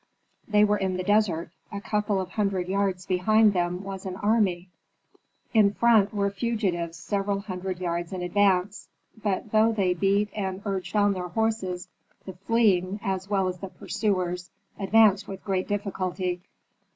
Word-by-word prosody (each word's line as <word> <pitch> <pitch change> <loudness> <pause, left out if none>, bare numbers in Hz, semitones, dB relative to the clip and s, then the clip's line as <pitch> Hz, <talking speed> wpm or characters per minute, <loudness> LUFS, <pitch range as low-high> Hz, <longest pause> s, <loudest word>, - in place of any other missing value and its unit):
They 210 -1 +4
were 210 0 +2
in 190 -1 -1
the 185 - -2
desert; 185 -5 +1 0.2
a 200 - -4
couple 210 -1 -1
of 185 -1 -4
hundred 195 -4 -1
yards 190 -1 -1
behind 215 +3 +3
them 180 0 -1
was 195 -1 -6
an 185 -1 -5
army; 195 -4 +1 0.8
in 205 -3 +4
front 225 -4 +4
were 200 -2 0
fugitives 195 -6 -2
several 200 -1 -2
hundred 185 -2 -5
yards 170 -1 -3
in 185 -2 -4
advance. 195 +1 +1 0.3
But 205 0 -2
though 220 +1 +4
they 195 -5 +1
beat 200 +3 +1
and 190 -1 -3
urged 190 -1 -3
on 205 -1 +4
their 180 -1 -4
horses, 190 -2 -2 0.4
the 190 - -7
fleeing, 195 -1 +1
as 190 0 -2
well 195 -2 +1
as 180 -1 -4
the 195 - -6
pursuers, 180 -2 -2 0.3
advanced 205 0 +4
with 195 -1 -8
great 190 -2 -1
difficulty. 185 -3 -2
195 Hz, 155 wpm, -26 LUFS, 185-205 Hz, 0.8 s, They